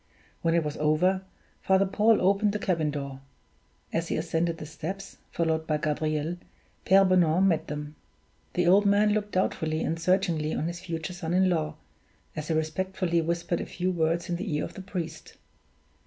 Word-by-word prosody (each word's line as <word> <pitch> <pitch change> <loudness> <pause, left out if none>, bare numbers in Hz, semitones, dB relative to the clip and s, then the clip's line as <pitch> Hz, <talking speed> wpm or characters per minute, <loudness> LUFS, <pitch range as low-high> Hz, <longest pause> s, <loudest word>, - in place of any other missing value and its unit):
When 165 0 +2
it 170 - +3
was 150 -1 -4
over, 165 +5 +2 0.4
Father 190 +1 +3
Paul 210 +3 +3
opened 200 +2 +3
the - - 0
cabin 170 -6 0
door. 140 -2 -5 0.7
As 165 0 0
he - - -1
ascended 165 +1 -1
the 155 - -7
steps, 185 +6 -7
followed 160 -1 -1
by 155 - +1
Gabriel, 155 +2 -1 0.5
Pere 195 +1 +6
Bonan 180 -1 +4
met 165 -3 +1
them. 150 0 -6 0.6
The 180 - +2
old 200 +4 +5
man 205 +1 +4
looked 210 -1 -2
doubtfully 160 -4 0
and 165 +1 -1
searchingly 165 -3 +1
on - - -1
his 170 +1 -4
future 165 0 -5
son 175 -1 -3
in 185 0 +4
law, 155 -2 -1 0.6
as 155 -1 -4
he 160 - 0
respectfully 170 +2 0
whispered 170 +1 -1
a - - -4
few 185 +1 -1
words 170 0 0
in 175 - -1
the 185 -4 -3
ear 150 - 0
of - - -6
the - - -8
priest. 170 -4 -6
170 Hz, 180 wpm, -27 LUFS, 155-190 Hz, 0.7 s, Pere